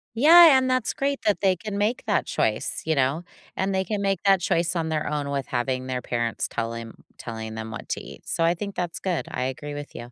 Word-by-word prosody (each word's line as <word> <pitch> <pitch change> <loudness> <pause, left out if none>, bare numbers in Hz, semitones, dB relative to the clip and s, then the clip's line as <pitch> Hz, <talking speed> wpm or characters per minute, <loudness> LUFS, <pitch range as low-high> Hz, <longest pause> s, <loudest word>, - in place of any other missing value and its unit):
Yeah, 320 +3 +8
and 260 0 +3
that's 255 0 +1
great 275 -2 -2
that 210 -2 +1
they 190 -2 +3
can 205 +3 -6
make 220 +4 0
that - - +1
choice, - - -1
you 160 - +2
know, 140 +4 +1 0.3
and 190 +1 0
they 190 0 +1
can 210 +1 -3
make 195 -2 0
that 195 -2 +5
choice 170 +1 +1
on 160 -1 -1
their 155 -1 -1
own 145 -1 -2
with 140 -2 -2
having 130 +1 -2
their 125 -1 -3
parents 120 -1 -2
telling 115 0 -4 0.6
them 110 0 -6
what 115 - -8
to - - -2
eat, - - -13
so 165 - 0
I 170 +1 +4
think 200 +3 -6
that's 175 -2 -3
good, 180 -3 -2
I 125 - -2
agree 145 +3 -5
with 145 0 -8
you, 120 +1 -8
165 Hz, 230 wpm, -25 LUFS, 130-200 Hz, 0.6 s, Yeah